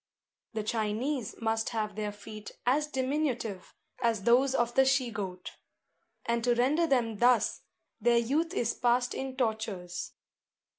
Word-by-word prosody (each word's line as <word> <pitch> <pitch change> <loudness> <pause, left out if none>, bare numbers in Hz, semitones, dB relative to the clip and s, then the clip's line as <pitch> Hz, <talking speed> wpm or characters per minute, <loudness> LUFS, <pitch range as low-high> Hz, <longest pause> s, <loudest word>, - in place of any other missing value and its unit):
The 220 -1 -2
Chinese 220 +3 -2
must 225 0 0
have 215 -3 -2
their 210 -1 -2
feet 210 +1 -10
as 290 +5 +2
diminutive 260 -8 -2 0.3
as 230 -4 +1
those 260 +4 +4
of 240 -1 +1
the 265 - +5
she 260 -2 +2
goat; 190 -4 -5 0.7
and 235 0 0
to 240 0 +3
render 290 +8 +3
them 235 -6 +1
thus, 245 -2 +3 0.4
their 235 +1 +4
youth 290 +8 +1
is 235 - 0
passed 245 +1 +1
in 265 -1 -5
tortures. 215 -7 -2
235 Hz, 140 wpm, -30 LUFS, 215-260 Hz, 0.7 s, the